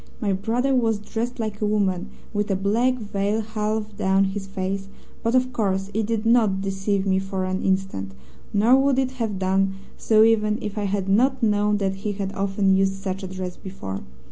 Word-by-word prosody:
My 200 Hz, -3 st, 0 dB
brother 235 Hz, +7 st, 0 dB
was 230 Hz, -4 st, +2 dB
dressed 230 Hz, +4 st, -4 dB
like 215 Hz, -2 st, -3 dB
a -, -, +2 dB
woman, 200 Hz, -2 st, 0 dB, 0.2 s
with 205 Hz, 0 st, -1 dB
a 195 Hz, -, +2 dB
black 225 Hz, +7 st, +2 dB
veil 205 Hz, -1 st, -1 dB
half 215 Hz, 0 st, -3 dB
down 190 Hz, +1 st, +3 dB
his 195 Hz, 0 st, -3 dB
face, 195 Hz, 0 st, -3 dB, 0.3 s
but 230 Hz, +2 st, +1 dB
of 255 Hz, 0 st, +2 dB
course 195 Hz, -3 st, -1 dB
it 220 Hz, 0 st, 0 dB
did 225 Hz, -1 st, -1 dB
not 225 Hz, -5 st, +4 dB
deceive 195 Hz, 0 st, -1 dB
me 190 Hz, -1 st, +2 dB
for 190 Hz, -1 st, -3 dB
an 185 Hz, 0 st, -2 dB
instant, 190 Hz, -, -1 dB, 0.4 s
nor 220 Hz, +5 st, +5 dB
would 275 Hz, -1 st, +2 dB
it 265 Hz, -1 st, +1 dB
have 215 Hz, -4 st, -1 dB
done 190 Hz, +1 st, +1 dB, 0.2 s
so 220 Hz, -1 st, +5 dB
even 215 Hz, -1 st, +3 dB
if 210 Hz, -1 st, -5 dB
I 210 Hz, -1 st, -1 dB
had 195 Hz, -1 st, -1 dB
not 250 Hz, +6 st, +2 dB
known 210 Hz, -1 st, +3 dB
that 195 Hz, -1 st, -1 dB
he 205 Hz, +1 st, -3 dB
had 195 Hz, -1 st, -4 dB
often 195 Hz, 0 st, +2 dB
used 195 Hz, 0 st, +2 dB
such 195 Hz, 0 st, -4 dB
a 190 Hz, -, -5 dB
dress 185 Hz, -1 st, -5 dB
before. 100 Hz, -, -6 dB
205 Hz, 195 wpm, -24 LUFS, 195-220 Hz, 0.4 s, nor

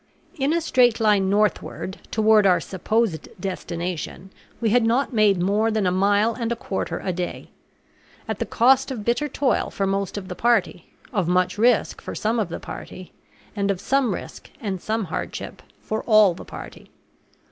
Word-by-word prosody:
In 275 Hz, +2 st, +1 dB
a 335 Hz, +1 st, +1 dB
straight 245 Hz, -7 st, +3 dB
line 205 Hz, -3 st, +3 dB
northward, 205 Hz, -1 st, -1 dB
toward 215 Hz, -2 st, +4 dB
our 180 Hz, -2 st, +4 dB
supposed 190 Hz, -1 st, -1 dB
destination, 180 Hz, 0 st, -5 dB, 0.3 s
we 225 Hz, -3 st, +1 dB
had 245 Hz, +1 st, +4 dB
not 245 Hz, +4 st, +1 dB
made 210 Hz, -4 st, +4 dB
more 205 Hz, +5 st, +2 dB
than 215 Hz, -3 st, 0 dB
a 180 Hz, -, +2 dB
mile 205 Hz, +4 st, +2 dB
and 235 Hz, -1 st, -3 dB
a -, -, +1 dB
quarter 195 Hz, -4 st, -4 dB
a 185 Hz, -, 0 dB
day; 175 Hz, 0 st, -5 dB, 0.8 s
at -, -, -3 dB
the -, -, -2 dB
cost 265 Hz, +3 st, +4 dB
of 230 Hz, -6 st, -5 dB
bitter 240 Hz, +5 st, +1 dB
toil 265 Hz, -4 st, 0 dB
for 195 Hz, -, -2 dB
most 195 Hz, 0 st, -1 dB
of 190 Hz, -2 st, -6 dB
the 180 Hz, -, -5 dB
party, 200 Hz, -4 st, +1 dB, 0.3 s
of 195 Hz, -6 st, 0 dB
much 180 Hz, +2 st, +1 dB
risk 235 Hz, 0 st, +2 dB
for -, -, -7 dB
some 225 Hz, +2 st, 0 dB
of 205 Hz, -5 st, -1 dB
the -, -, -5 dB
party, 185 Hz, -1 st, -9 dB, 0.4 s
and 200 Hz, -1 st, 0 dB
of 195 Hz, -2 st, 0 dB
some 270 Hz, 0 st, +1 dB
risk -, -, -9 dB
and 195 Hz, -8 st, -4 dB
some 220 Hz, +1 st, -1 dB
hardship 175 Hz, -, -5 dB, 0.2 s
for 220 Hz, 0 st, -3 dB
all 215 Hz, -5 st, +6 dB
the 170 Hz, -, -10 dB
party. -, -, -10 dB
210 Hz, 180 wpm, -23 LUFS, 190-230 Hz, 0.8 s, all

